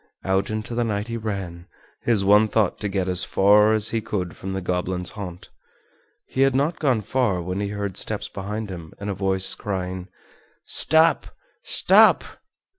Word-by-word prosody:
Out 95 +1 0
into 110 +2 -4
the 120 +1 0
night 105 -1 -3
he 115 - -3
ran, 95 -6 -5 0.3
his 110 -5 +1
one 105 +2 +5
thought 105 -3 0
to 105 - -3
get 95 -1 -2
as 90 0 0
far 105 +3 +4
as 110 0 +1
he 115 - -1
could 90 -5 -4
from 95 0 -6
the 95 - -2
goblin's 90 0 -2
haunt. 95 -4 -8 0.8
He 130 - -3
had 135 -1 +3
not 150 +5 0
gone 130 -7 +1
far 110 -3 0
when 90 +2 -4
he 100 - -2
heard 100 -2 -4
steps - - -2
behind 105 +1 -5
him 85 -3 -9
and 100 0 -4
a - - -2
voice 95 -1 +3
crying: 95 -2 -4 0.6
"Stop! 160 +1 +3 0.3
stop!" - - +4
100 Hz, 175 wpm, -23 LUFS, 95-110 Hz, 0.8 s, one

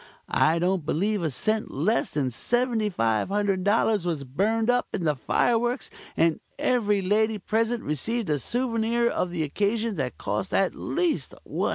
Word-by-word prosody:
I 160 +2 +4
don't 180 0 +1
believe 195 +7 0
a 165 - 0
cent 215 - -1
less 180 +9 0
than 140 -4 +1
$7,500 205 - +1
was 160 -5 -1
burned 210 - 0
up 245 0 +1
in 190 - -3
the 150 -2 +2
fire 230 - +2
works, 240 +2 -2 0.3
and 165 -1 +3 0.2
every 210 -5 +1
lady 215 +3 +2
present 225 +4 -1
received 220 - -1
a 150 -2 +1
souvenir 235 - 0
of 180 - 0
the 170 -2 -2
occasion 210 +7 -1
that 130 -3 -3
cost 185 - -2
at 195 - +2
least 345 -1 -1
$100." - - -1
205 Hz, 155 wpm, -26 LUFS, 165-230 Hz, 0.3 s, I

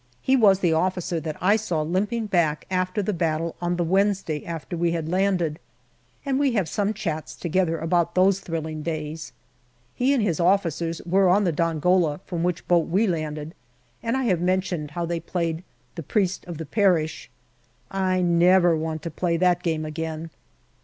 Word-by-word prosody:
He 265 - +2
was 200 -6 +5
the 170 -3 +3
officer 180 0 0
that 155 -1 -5
I 200 +3 +4
saw 180 -8 -1
limping 205 +8 -1
back 170 -7 +1
after 185 +2 0
the 210 - -1
battle 165 -1 -1
on 175 0 0
the 175 - 0
Wednesday 190 -3 +1
after 165 0 -5
we 170 0 0
had 165 -2 -2
landed, 180 -3 0 0.7
and 270 -1 0
we 280 -3 +2
have 195 -7 +1
some 205 +5 0
chats 165 -8 -4
together 170 -1 0
about 165 +1 0
those 190 +1 +4
thrilling 160 -4 -4
days. 155 0 -5 0.6
He 255 +2 +1
and 265 -6 +2
his 175 -7 0
officers 170 -2 +1
were 190 +2 +3
on 200 +3 +4
the 180 - +2
Dongola, 165 0 +1
from 175 -3 -4
which 175 0 -2
boat 175 -2 +3
we 195 +7 +2
landed, 155 -4 -3 0.5
and 230 +3 -1
I 265 - -1
have 185 -8 +1
mentioned 180 -4 -1
how 170 - 0
they 170 0 -2
played 165 0 -3 0.2
" - - -39
The 170 - -6
Priest 190 +3 -1
of 175 -3 -7
the 160 - -5
Parish." 175 -3 +1 0.6
I 185 -1 +1
never 175 0 +4
want 160 -1 -3
to 170 - -4
play 170 +1 0
that 180 0 +2
game 160 -3 -1
again. 160 +1 -5
175 Hz, 180 wpm, -24 LUFS, 160-190 Hz, 0.7 s, was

